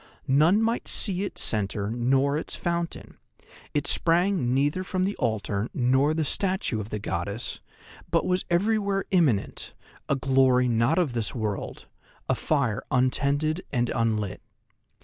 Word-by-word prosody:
None 160 +10 +4
might 230 +2 -1
see 190 -4 +3
its 200 - -2
centre 105 -1 -1
nor 135 +4 +1
its 155 - -4
fountain; 170 -1 -4 0.5
it 145 -1 -1
sprang 175 -5 +1
neither 145 +7 +1
from 185 0 -1
the 200 +2 -1
altar 110 -2 -1
nor 130 +5 +2
the 160 -1 0
statue 185 - 0
of 105 0 -6
the 105 - -3
goddess, 100 +3 -4 0.5
but - - +1
was 180 0 0
everywhere 200 +2 +1
imminent, 150 - +1 0.3
a - - +3
glory 130 -1 +3
not 115 +6 +2
of 165 -9 +1
this 115 +2 -1
world, 105 -4 -4 0.4
a - - +2
fire 125 -9 0
untended 140 +6 +1
and 120 -2 0
unlit. 110 -4 -1
135 Hz, 140 wpm, -26 LUFS, 115-175 Hz, 0.5 s, None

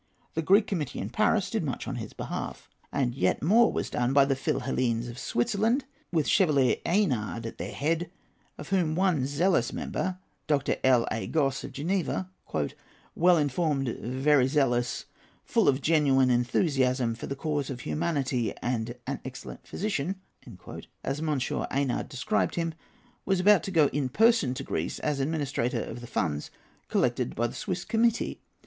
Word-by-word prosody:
The 160 - 0
Greek 200 +6 +5
Committee 165 -10 -3
in - - -4
Paris - - +2
did - - 0
much - - -4
on - - -3
his - - -6
behalf, - - -5 0.2
and 125 -3 0
yet 95 -5 0
more 225 +8 +5
was - - -3
done 125 +2 0
by 140 -1 +6
the 135 -1 +1
Philhellenes 120 -3 -1
of 120 +1 -8
Switzerland, 230 +4 +1 0.3
with 160 -4 +1
Chevalier 145 -9 +3
Eynard 125 - 0
at 115 - -7
their - - -4
head, 165 +3 -1 0.5
of - - -9
whom 175 -5 +1
one 175 -8 +2
zealous 170 +6 +2
member, 185 -1 -3 0.3
Dr. 145 -3 +1
L.A. 120 -3 +2
Gosse, 135 -4 0
of 140 - -9
Geneva, 180 +5 -1 0.9
"well 175 +1 +5
informed, 145 -2 0
very 130 +3 +2
zealous, 125 -4 +1 0.4
full - - +2
of 135 0 +3
genuine 135 -5 +4
enthusiasm 125 -1 +2
for 115 - -7
the 140 - -3
cause 145 -1 -2
of 125 -3 -5
humanity, 140 -8 -1
and 120 -1 -2
an 140 +1 -3
excellent 130 0 -9
physician," 195 -3 -2 0.9
as 135 +2 -2
M. 155 -2 0 0.3
Eynard 135 -2 -1
described 140 - 0
him, 165 -2 -1 0.5
was 190 -2 +1
about 200 -1 +6
to 195 - -5
go 165 -5 +4
in 140 -2 -1
person 220 - +3
to - - -4
Greece, 80 +2 -3
as 150 -2 -1
administrator 135 -5 -1
of 120 - -7
the 120 - -8
funds 75 -10 -2 0.4
collected - - 0
by 120 - +1
the 120 - -3
Swiss 185 -2 -4
Committee. 230 0 +1
140 Hz, 160 wpm, -28 LUFS, 125-170 Hz, 0.9 s, by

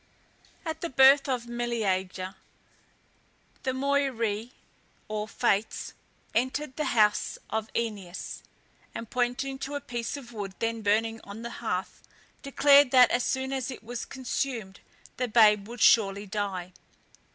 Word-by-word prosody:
At 320 0 -4
the 340 - -2
birth 270 +1 +6
of 250 -2 -1
Meleager, 195 -6 -2 1.3
the 265 - -2
Moirae, 260 -5 0 0.6
or 215 0 -3
Fates, 220 -2 -1 0.4
entered 260 +3 -1
the 305 - -1
house 210 -1 +3
of 220 0 -2
Oeneus, 205 -6 -4 0.5
and 230 - -6
pointing 255 +2 -1
to 285 +2 -5
a - - -1
piece 240 -1 -4
of 240 -4 -11
wood 200 -3 -5
then 230 0 -2
burning 225 +2 +1
on 205 +3 -9
the 235 - -5
hearth, 190 -4 -3 0.4
declared 280 0 +5
that 250 -2 +6
as 245 - +2
soon 265 0 -1
as 265 -2 -2
it 255 - -8
was 240 +1 -5
consumed 245 -6 -4 0.4
the 250 - 0
babe 210 -3 +5
would 240 +1 -8
surely 200 -2 +5
die. 190 -3 -4
235 Hz, 135 wpm, -28 LUFS, 210-265 Hz, 1.3 s, birth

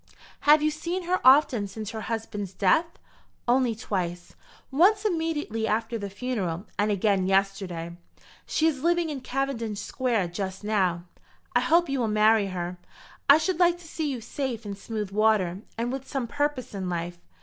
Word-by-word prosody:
"Have 300 0 +7
you 305 - +3
seen 340 +4 -3
her 360 +2 0
often 255 -5 +5
since 215 +2 -6
her 220 - -5
husband's 210 -4 -4
death?" 200 - +3 0.6
"Only 245 -1 +3
twice; 175 -5 -4 0.4
once 395 +9 +4
immediately 320 - -1
after 225 +2 -1
the 200 -1 -4
funeral, 200 -5 -3
and 205 +1 +2
again 200 -2 +2
yesterday. 190 -3 0 0.5
She 315 - +1
is 295 -5 +1
living 340 0 +1
in 275 -3 -5
Cavendish 245 -6 -2
Square 225 -4 -1
just 190 +2 -5
now." 185 -5 +1 0.5
"I - - +6
hope 340 +2 +3
you 275 -1 -1
will 235 - +1
marry 215 -1 +4
her. 180 -1 -4 0.5
I 285 - +10
should 360 +2 -1
like 350 -1 +4
to 350 -1 -14
see 315 -1 -3
you 255 -4 -4
safe 240 -2 -4
in 200 -1 -4
smooth 210 0 -5
water, 205 -3 +2 0.2
and 235 +1 -1
with 270 0 -5
some 270 -4 -2
purpose 290 -1 -2
in 190 -2 -3
life. 175 0 -4
225 Hz, 170 wpm, -26 LUFS, 195-285 Hz, 0.6 s, I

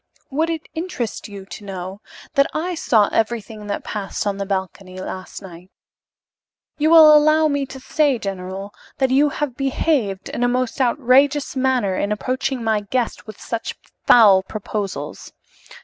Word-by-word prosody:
"Would 315 +4 0
it 325 -1 -4
interest 320 - -4
you 200 -2 -9
to 205 - -10
know 190 0 -7 0.3
that 275 0 +4
I 350 +4 -1
saw 220 -10 +3
everything 220 -2 -2
that 200 - -3
passed 210 -1 -4
on 200 -1 -1
the 200 -1 -4
balcony 190 -1 -4
last 185 +1 -7
night? 180 0 -12 1.1
You 305 +1 +3
will 320 -2 +9
allow 310 +1 +5
me 285 -2 -1
to 265 - -9
say, 285 0 +1
general, 195 -1 -6 0.2
that 265 -1 +1
you 285 +3 +4
have 290 -3 -3
behaved 265 -7 -1
in 245 - -3
a - - +4
most 255 +2 -1
outrageous 275 +3 +3
manner 255 -7 +1
in 200 - -1
approaching 255 +3 -2
my 220 -1 +1
guest 235 +3 -3
with 215 - -10
such 230 -1 -4 0.3
foul 205 -5 +7
proposals. 205 0 -5
235 Hz, 155 wpm, -21 LUFS, 200-280 Hz, 1.1 s, will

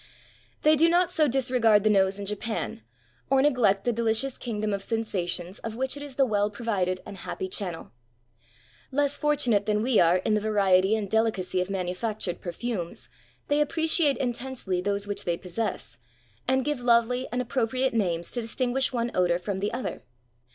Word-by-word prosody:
They 305 +1 +6
do 325 +3 +4
not 355 +1 +3
so 310 -4 +3
disregard 245 -5 +3
the 215 - +3
nose 195 -1 +3
in 200 - -5
Japan, 210 - -4 0.5
or 270 0 +4
neg 290 0 +3
lect 200 -3 +3
the 240 - +1
delicious 230 +3 +1
kingdom 215 -3 -3
of 200 - -2
sensations 190 -4 -3
of 225 -1 -6
which 260 +3 -1
it 285 - -8
is 285 -2 -8
the 270 - +4
well 205 -3 +1
provided 205 -5 -1
and 200 - -9
happy 190 - -5
channel. 180 - -3 1.0
Less 285 +1 +1
fortunate 255 -9 +2
than 210 0 +1
we 250 -2 +3
are 175 +1 +5
in 200 +4 0
the 210 - +2
variety 200 -2 +3
and 215 -2 -2
delicacy 195 -4 0
of 180 - -3
manufactured 190 0 -3
perfumes, 185 -1 -5 0.4
they 290 +1 +2
appreciate 315 -1 +2
intensely 245 -7 -2
those 200 +1 -1
which 205 0 -3
they 170 -1 -1
possess, 180 - -4 0.5
and 260 0 +2
give 295 -3 -1
lovely 245 +1 +2
and 245 - -1
appropriate 255 +1 0
names 175 -6 -1
to 240 - -1
dis 225 0 -5
tinguish 260 +1 0
one 240 -1 -1
odor 175 -1 +2
from 190 +2 -4
the 205 +2 -1
other. 245 +2 -4
220 Hz, 180 wpm, -26 LUFS, 195-255 Hz, 1.0 s, They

